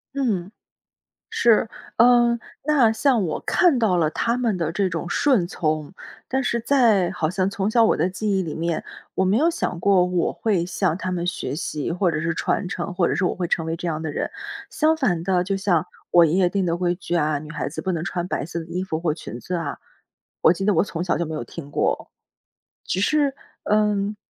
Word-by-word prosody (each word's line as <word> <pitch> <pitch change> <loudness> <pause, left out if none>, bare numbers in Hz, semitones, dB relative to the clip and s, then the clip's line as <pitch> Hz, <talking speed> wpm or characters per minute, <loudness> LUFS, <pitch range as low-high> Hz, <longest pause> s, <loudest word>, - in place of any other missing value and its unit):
嗯。 205 -9 -1 0.8
是， 230 -2 +4 0.3
嗯， 240 0 +5 0.3
那 270 -8 +4
像 230 -3 +2
我 155 - -2
看 340 -8 +3
到 215 -6 +2
了 160 -3 +2
他 235 +8 0
们 230 -6 0
的 165 -2 -1
这 190 +2 0
种 170 0 -4
顺 240 -2 +2
从， 155 -1 -2 0.3
但 265 +1 0
是 235 -1 0
在， 225 -8 +3
好 175 -4 -1
像 185 0 0
从 200 +1 -1
小 230 +1 +4
我 - - +3
的 170 +4 +1
记 200 +1 -1
忆 190 - +1
里 160 -3 -5
面， 165 0 -2 0.3
我 190 - +1
没 195 +4 +3
有 320 +5 +4
想 180 - -2
过 190 -2 +4
我 180 -1 0
会 195 -6 0
向 175 -1 0
他 185 - -3
们 175 -1 -2
学 150 -6 -3
习 150 -2 -3
或 180 +1 +1
者 155 -2 -2
是 170 +1 -1
传 185 - -1
承， 180 -2 -4
或 175 -1 +1
者 - - 0
是 180 +6 0
我 - - +1
会 175 -2 -3
成 165 - 0
为 160 0 -2
这 175 - -4
样 155 -1 -2
的 160 - -3
人。 - - -2 0.4
相 315 +1 +2
反 190 - 0
的， 180 -2 +2
就 195 +1 -1
像， 180 -5 +1 0.2
我 170 -1 +6
爷 155 - 0
爷 180 -1 +3
定 195 -1 0
的 170 0 0
规 175 0 0
矩 175 -1 -5
啊， 150 -2 +1
女 150 +1 -10
孩 150 -1 -3
子 155 - -5
不 190 - -2
能 165 -1 -2
穿 175 0 -3
白 - - -2
色 170 +2 -5
的 165 - -8
衣 180 +3 -3
服 160 -4 -3
或 165 -3 0
裙 120 -7 -8
子 180 - -5
啊， 165 -5 -3 0.6
我 - - +7
记 195 +2 -3
得 210 - +3
我 165 - +3
从 175 -4 -4
小 180 - 0
就 170 - -1
没 160 - -5
有 155 - -3
听 145 -4 -9
过， - - -1 0.7
只 185 - -2
是， 285 +3 +2 0.3
嗯 210 -1 +1
180 Hz, 245 characters per minute, -23 LUFS, 165-210 Hz, 0.8 s, 我